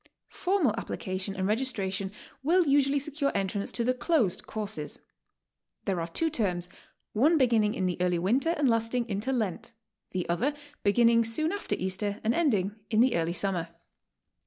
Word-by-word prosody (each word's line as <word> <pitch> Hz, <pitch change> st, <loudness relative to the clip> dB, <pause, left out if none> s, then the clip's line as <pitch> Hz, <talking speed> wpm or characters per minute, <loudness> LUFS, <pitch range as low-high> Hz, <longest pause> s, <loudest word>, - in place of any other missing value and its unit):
Formal 360 Hz, -, +1 dB
application 190 Hz, -1 st, -4 dB
and 190 Hz, -1 st, -1 dB
registration 200 Hz, -4 st, -1 dB, 0.3 s
will 345 Hz, +6 st, +3 dB
usually 280 Hz, 0 st, +3 dB
secure 285 Hz, 0 st, -1 dB
entrance 200 Hz, +1 st, -1 dB
to 235 Hz, -, -1 dB
the 250 Hz, +2 st, +2 dB
''closed 255 Hz, -, +1 dB
courses." 205 Hz, -9 st, -4 dB, 0.9 s
There 185 Hz, -3 st, 0 dB
are 165 Hz, -, -3 dB
two 320 Hz, -, -1 dB
terms, 180 Hz, -, 0 dB, 0.4 s
one 300 Hz, +10 st, +4 dB
beginning 230 Hz, -6 st, +3 dB
in 185 Hz, -, -1 dB
the 180 Hz, -1 st, -1 dB
early 180 Hz, -1 st, +2 dB
winter 255 Hz, -, +1 dB
and 290 Hz, -, +2 dB
lasting 230 Hz, +1 st, +1 dB
into 210 Hz, +4 st, -2 dB
Lent; 225 Hz, -2 st, -2 dB, 0.4 s
the 180 Hz, -1 st, -3 dB
other 245 Hz, +13 st, 0 dB, 0.3 s
beginning 230 Hz, +3 st, +4 dB
soion 230 Hz, +8 st, +1 dB
after 405 Hz, -, -2 dB
Easter 200 Hz, +3 st, -2 dB
and 225 Hz, +2 st, +2 dB
ending 215 Hz, -, +1 dB
in 215 Hz, -, +2 dB
the 245 Hz, +1 st, +4 dB
early 170 Hz, 0 st, 0 dB
summer. 180 Hz, -2 st, -1 dB
220 Hz, 160 wpm, -28 LUFS, 190-265 Hz, 0.9 s, one